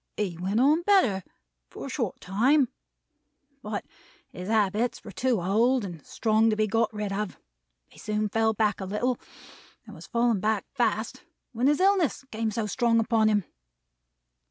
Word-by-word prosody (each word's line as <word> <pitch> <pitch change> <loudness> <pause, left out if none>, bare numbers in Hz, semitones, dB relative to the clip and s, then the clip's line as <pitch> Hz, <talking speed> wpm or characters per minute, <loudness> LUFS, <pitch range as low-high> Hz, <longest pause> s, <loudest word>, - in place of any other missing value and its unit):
"He 195 -5 -2
went 190 +6 -1
on 295 +6 +4
better 345 - +3 0.5
for - - -8
a - - -6
short - - -3
time; 250 +8 +2 0.9
but, 210 -1 -4 0.5
his 180 +1 -8
habits 220 +2 +1
were - - -9
too 250 -4 0
old 225 +6 +2
and 170 -6 -8
strong 220 0 +2
to 215 - +1
be 215 0 +2
got 225 +1 +1
rid 210 -2 -4
of; 210 -1 -3 0.5
he - - -18
soon 215 0 -1
fell 220 +1 +1
back 210 -1 +1
a - - -3
little; 235 +6 -1 0.7
and - - -12
was - - -12
falling 235 -4 +1
fast 215 +3 -1
back, 230 -3 +1 0.4
when 245 +1 0
his 295 +1 +3
illness 375 -8 +2
came 225 0 -1
so 215 +1 -2
strong 230 +2 +2
upon 225 -1 +2
him. 210 -2 +2
220 Hz, 165 wpm, -27 LUFS, 210-240 Hz, 0.9 s, on